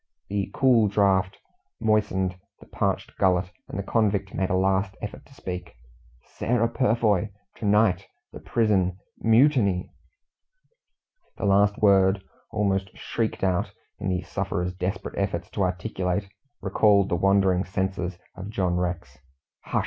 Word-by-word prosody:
The 100 -1 -1
cool 120 -5 +4
draught 95 -2 +2 0.4
moistened 105 -4 +1 0.3
his - - -17
parched - - -1
gullet, 90 -1 +2 0.2
and - - -6
the 100 - -2
convict 100 -3 0
made 95 - -1
a - - +1
last 95 +1 +1
effort 105 - -8
to - - -19
speak. 90 -7 -6 0.5
"Sarah 115 0 0
Purfoy 110 -5 +1 0.3
to 115 - -5
night 100 -2 +3 0.3
the - - -8
prison 95 -5 +1 0.2
MUTINY!" 115 -6 +3 1.5
The - - -3
last 100 +1 +3
word, 95 -1 +4 0.3
almost 100 -3 0
shrieked 115 -4 -3
out, 95 -2 0 0.3
in - - -2
the 90 -1 -1
sufferer's 90 -1 -3
desperate 90 +2 -4
efforts 95 -4 -2
to 100 - -3
articulate, 90 +1 -1 0.3
recalled 100 -3 +3
the - - +1
wandering 95 0 +3
senses 95 -2 -3 0.2
of 100 +1 -7
John 90 -5 0
Rex. 85 -8 -3 0.5
"Hush!" - - 0
95 Hz, 135 wpm, -25 LUFS, 90-105 Hz, 1.5 s, cool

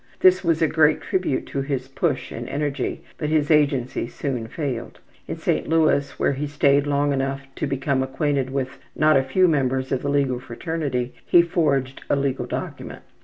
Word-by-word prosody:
This 185 0 +5
was 165 -2 +2
a - - +4
great 155 0 +3
tribute 185 -8 -1
to 140 - -2
his 135 -2 -3
push 135 - -2
and - - -6
energy, 145 0 -2 0.2
but 150 - -1
his 155 -1 +2
agency 140 -6 +2
soon 125 -3 -4
failed. 130 -3 -4 0.3
In - - -4
St. - - -1
Louis, 155 -3 +3
where - - +2
he 145 +2 -3
stayed 145 0 +3
long 145 0 +1
enough 135 0 -1 0.2
to - - -1
become 135 0 0
acquainted 135 0 -1
with 130 -1 -3 0.2
not 155 0 +4
a 135 - +5
few 180 +8 +3
members 130 -4 0
of 130 - 0
the 140 - -2
legal 140 -3 +1
fraternity, 130 0 -3
he 175 - +6
forged 140 -6 0
a - - +3
legal 140 -1 -1
document. - - -6
140 Hz, 180 wpm, -23 LUFS, 130-150 Hz, 0.3 s, he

